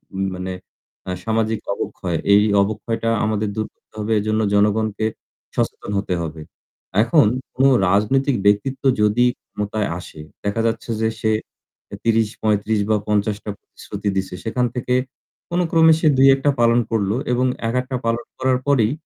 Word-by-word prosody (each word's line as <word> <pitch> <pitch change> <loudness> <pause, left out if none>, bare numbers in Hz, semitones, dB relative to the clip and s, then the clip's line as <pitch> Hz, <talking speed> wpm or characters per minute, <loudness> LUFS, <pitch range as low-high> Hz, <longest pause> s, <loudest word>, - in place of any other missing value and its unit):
উ - - -5 0.2
মানে 90 0 -4 0.6
আ - - -1
সামাজিক 110 -1 0
অবক্ষয়। 90 -3 -3 0.2
এই 100 +1 +6 0.2
অবক্ষয়টা 110 +3 -2 0.2
আমাদের 110 -1 -1
দূর 110 0 -2
করতে - - -48
হবে। 105 +1 -2
এজন্য 110 +1 0
জনগণকে 105 +1 +2 0.5
সচেতন - - -2
হতে 95 -2 -2
হবে। 80 -1 -6 0.6
এখন 150 -3 +4 0.3
কোন 130 - +1 0.3
রাজনৈতিক 130 +7 +2
ব্যক্তিত্ব 115 +7 +2 0.2
যদি 105 +4 +3 0.2
ক্ষমতায় 105 0 -2
আসে, 80 - -11 0.2
দেখা 100 +3 -1
যাচ্ছে 115 +1 -3
যে 110 - +2
সে 110 - +1 0.6
এ - - -3
৩০-৩৫ 110 -1 +1
বা 110 - +4
৫০ 105 0 +1
টা 105 - -4
প্রতিশ্রুতি 105 - -6
দিছে। 95 -1 -2
সেখান 125 +2 0
থেকে 125 0 -1 0.6
কোন 175 - 0
ক্রমে 160 -1 +6
সে 160 - +2
২-১ 135 0 +6
টা 145 - +5
পালন 115 0 +4
করলো 105 -2 +1 0.2
এবং 125 +1 +2 0.2
একেকটা 125 +2 -1
পালন 115 +1 0
করার 130 -1 +1
পরেই 125 -5 +3
110 Hz, 150 wpm, -21 LUFS, 105-125 Hz, 0.6 s, এই